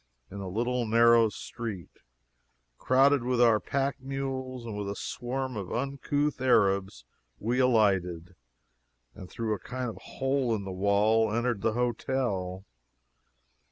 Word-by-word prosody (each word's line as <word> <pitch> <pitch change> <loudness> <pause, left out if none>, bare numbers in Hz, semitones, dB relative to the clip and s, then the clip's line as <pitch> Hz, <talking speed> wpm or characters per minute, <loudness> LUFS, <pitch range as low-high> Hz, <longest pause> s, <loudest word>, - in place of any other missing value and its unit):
In 100 - -7
a 95 -1 -5
little 120 +4 -1
narrow 115 0 +5
street, 105 -4 -7 0.9
crowded 135 +1 +4
with 125 0 0
our 115 -3 +5
pack 140 +3 -2
mules 130 -2 -4
and 110 -3 -5
with 100 -1 -4
a 100 - -4
swarm 130 +3 -4
of 100 -4 -5
uncouth 140 +2 -1
Arabs, 100 - +2 0.3
we 120 +4 -1
alighted, 95 -8 +2 0.8
and 90 - -11
through 115 -2 -2
a 105 - -4
kind 125 -2 -4
of - - -12
a - - -14
hole 135 -3 +1
in 100 - -4
the 95 - -6
wall 105 +3 +2
entered 120 -1 0
the 110 - +1
hotel. 115 -6 -2
115 Hz, 140 wpm, -28 LUFS, 100-130 Hz, 0.9 s, narrow